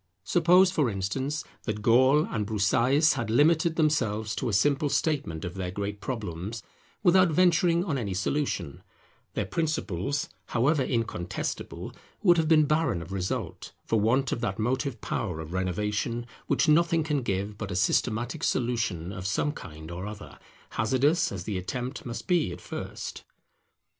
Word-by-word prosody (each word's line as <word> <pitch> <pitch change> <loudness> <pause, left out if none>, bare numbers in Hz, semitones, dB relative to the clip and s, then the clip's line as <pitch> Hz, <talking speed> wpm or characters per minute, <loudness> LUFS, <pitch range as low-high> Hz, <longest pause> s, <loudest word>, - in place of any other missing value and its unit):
Suppose, 180 - +5
for 150 -9 +1
instance, 130 +10 -2 0.2
that 105 -2 -3
Gall 130 +6 +5
and 105 -4 -3
Broussais 120 - +3
had 120 -6 -3
limited 160 +6 +3
themselves 115 -9 +1
to - - -1
a - - -2
simple 140 +7 +2
statement 135 - -1
of 85 - -5
their 95 -1 -4
great 100 +2 -4
problems 105 -2 -5 0.4
without 185 -1 +5
venturing 170 +1 +3
on 145 -8 -1
any 100 -5 -3
solution; 95 - -2 0.5
their - - 0
principles, 140 - -1 0.2
however 135 +5 +2
incontestable, 115 -8 -3 0.3
would 175 -4 +6
have 160 -1 +2
been 155 -1 +5
barren 150 - +1
of 85 - -12
result, 95 -1 -4
for 115 - +1
want 120 +5 +2
of 115 - -2
that 95 - -2
motive 130 +3 -1
power 90 -8 -3
of 80 +1 -7
renovation 105 +6 -1 0.2
which - - +2
nothing 165 +1 +4
can 150 -2 0
give 100 -2 -2
but 105 -2 -6
a 90 - -3
systematic 110 +5 0
solution 110 -8 0
of 90 +1 -4
some 105 +9 0
kind 80 - -9
or 90 +4 -5
other, 105 -1 -9 0.3
hazardous 135 +9 +2
as 95 -3 -5
the 95 -1 -3
attempt 125 +8 -5
must 120 - -5
be 170 - +2
at - - -7
first. - - -6
120 Hz, 155 wpm, -27 LUFS, 100-150 Hz, 0.5 s, would